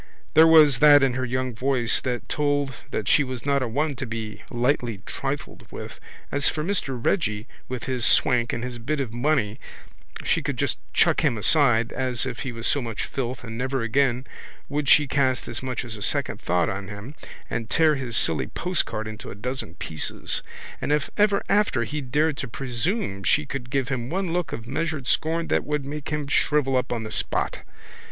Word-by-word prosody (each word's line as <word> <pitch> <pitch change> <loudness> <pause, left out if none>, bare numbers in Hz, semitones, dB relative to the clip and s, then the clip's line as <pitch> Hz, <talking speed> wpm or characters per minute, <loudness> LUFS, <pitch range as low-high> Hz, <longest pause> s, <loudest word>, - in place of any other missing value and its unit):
There 160 +1 +8
was 150 -5 +7
that 145 -1 +8
in 135 -2 +3
her 130 +1 -1
young 130 0 -2
voice 125 0 +2
that 125 -2 -3
told 145 -2 0 0.2
that 105 - -3
she 145 - +5
was 130 -2 -6
not 140 -1 +2
a 130 - 0
one 145 +5 -1
to 135 0 -4
be 110 -2 -5
lightly 120 -4 0
trifled 140 +1 -5
with. - - -8 0.3
As 140 -1 +2
for 150 - -3
Mr 160 -8 -1
Reggy 110 - 0 0.2
with 125 -2 -4
his 130 -2 -2
swank 120 +1 +3
and 120 - -3
his 125 -1 -5
bit 140 +6 -2
of 125 -5 -3
money 120 -3 0 0.6
she - - +1
could - - -3
just - - 0
chuck - - +3
him 115 - +2
aside 120 -1 +3
as 130 -1 +1
if 130 -2 -4
he 130 - -3
was 115 -1 -5
so 145 - +2
much 115 -3 -4
filth 125 -2 -4
and 115 -1 -6
never 130 -1 -1
again 125 +1 +1 0.4
would 145 -1 -1
she 150 - +7
cast 130 -1 +1
as - - -4
much 130 -1 -3
as 115 -2 -6
a 105 - -10
second 100 - +1
thought 90 0 +1
on 100 -2 -4
him 105 +6 -8 0.3
and 115 -1 -4
tear 160 -2 +4
his 125 -5 -1
silly 80 - +2
postcard 165 -11 -2
into 110 0 -8
a - - -7
dozen 125 -5 -5
pieces. 80 -4 -2 0.4
And - - -1
if 150 0 +1
ever 205 -1 +3
after 200 - +2
he 150 +6 -4
dared 150 +3 +1
to 140 - -4
presume 125 - -2
she 150 +8 +3
could 135 -3 -5
give 135 -1 0
him 125 -2 -2
one 185 0 -1
look 175 -2 -1
of 115 - -6
measured 145 +2 -2
scorn 165 +4 +1
that - - +2
would 150 -2 -2
make 145 +1 -5
him 150 -1 -2
shrivel 140 -1 +2
up 125 - 0
on 115 -2 -2
the 110 - -6
spot. - - -1
130 Hz, 200 wpm, -25 LUFS, 115-145 Hz, 0.6 s, There